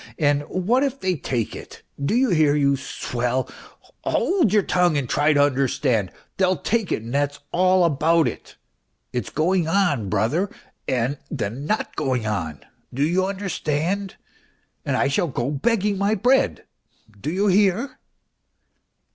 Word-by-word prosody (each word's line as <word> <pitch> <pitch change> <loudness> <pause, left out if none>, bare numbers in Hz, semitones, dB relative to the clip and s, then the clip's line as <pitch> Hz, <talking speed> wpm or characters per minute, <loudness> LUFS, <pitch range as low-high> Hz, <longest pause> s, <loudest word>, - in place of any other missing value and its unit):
And 145 -2 +2
what 210 +8 +1
if 275 -1 -1
they 185 -1 0
take 125 -6 -3
it? - - -11 0.2
do 145 - +1
you 260 +1 +3
hear, 155 -4 +4
you 140 -1 +3
swell? 125 -1 -2 0.6
Hold 350 - +2
your 210 -1 +4
tongue 180 -4 +2
and 135 -3 -1
try 150 +4 +2
to 145 -1 +4
understand! 130 -6 +1 0.3
They'll 185 -1 +2
take 220 +5 -1
it 110 - -1
and 115 +2 -7
that's 145 0 0
all 185 +1 +3
about 165 +1 +3
it... - - -7 0.6
it's 125 - -2
going 170 +2 +1
on, 160 - +1
brother, 120 - 0 0.4
and 130 +3 0
then 125 0 -4
not 215 - -1
going 130 -6 -1
on... 85 -9 -3 0.3
do 135 +3 -1
you 180 +5 +1
under 195 0 -4
stand? 180 +4 -2 0.7
And - - 0
I - - +2
shall 140 +5 +1
go 130 -2 -2
begging 200 - 0
my 200 +2 +2
bread, 230 - +2 0.5
do 145 +9 -3
you 195 +4 0
hear 205 +6 +2
155 Hz, 155 wpm, -23 LUFS, 135-190 Hz, 0.7 s, hear